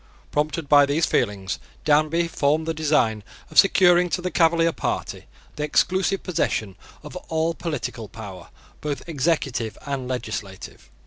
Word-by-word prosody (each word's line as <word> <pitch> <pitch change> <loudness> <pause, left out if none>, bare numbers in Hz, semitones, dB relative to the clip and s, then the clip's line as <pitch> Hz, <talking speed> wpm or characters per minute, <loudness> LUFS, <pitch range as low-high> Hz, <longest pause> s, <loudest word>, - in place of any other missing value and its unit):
Prompted 150 +1 -1
by 145 -1 +6
these 150 +4 +2
feelings, 100 -4 -1 0.3
Danby 155 +3 +3
formed 155 0 +1
the 165 - -1
design 145 -9 +1 0.3
of - - +5
securing 180 -2 +5
to 180 - -1
the 180 0 -3
Cavalier 165 0 +3
party - - -4 0.3
the 150 - -2
exclusive 185 +5 +1
possession 110 - -1 0.3
of 150 - -10
all 160 +1 0
political 150 -9 -5
power 100 -5 -10 0.3
both 150 +1 -4
executive 135 -7 -1
and 135 -3 -3
legislative. 105 -6 -6
150 Hz, 135 wpm, -23 LUFS, 125-165 Hz, 0.3 s, by